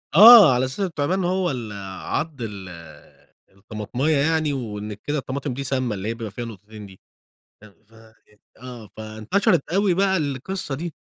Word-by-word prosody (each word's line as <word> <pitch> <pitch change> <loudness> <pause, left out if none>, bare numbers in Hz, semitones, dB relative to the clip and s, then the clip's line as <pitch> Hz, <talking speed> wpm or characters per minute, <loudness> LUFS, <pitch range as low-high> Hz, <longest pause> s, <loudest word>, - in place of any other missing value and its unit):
آه، 210 - +10
على 125 +1 +1
أساس 130 +6 -6
التِّعبَان 180 0 -1
هو 180 -1 0
ال 120 -5 -6 0.3
عَضّ 155 -4 -3
ال 100 -4 -7 0.8
الطَّماطماية 110 +9 -3
يعني، 155 0 +1
وإن 105 -5 -5
كده 145 +9 -4
الطَّماطم 135 0 -4
دي 140 +3 -5
سَامَّة، 130 -4 -1
اللي 95 +1 -5
هي 115 - -1
بيبقى 115 -3 -7
فيها 120 +4 -6
نُقطتين 105 -1 -11
دي، 95 -1 -15 0.6
أ 110 - -14 0.2
ف 115 - -27 0.7
آه، 120 -4 -10
فانتشرت 110 - 0
أوي 195 -1 +2
بقى 190 0 +2
القصَّة 145 +2 -4
دي. 165 +2 -6
130 Hz, 155 wpm, -22 LUFS, 110-160 Hz, 0.8 s, آه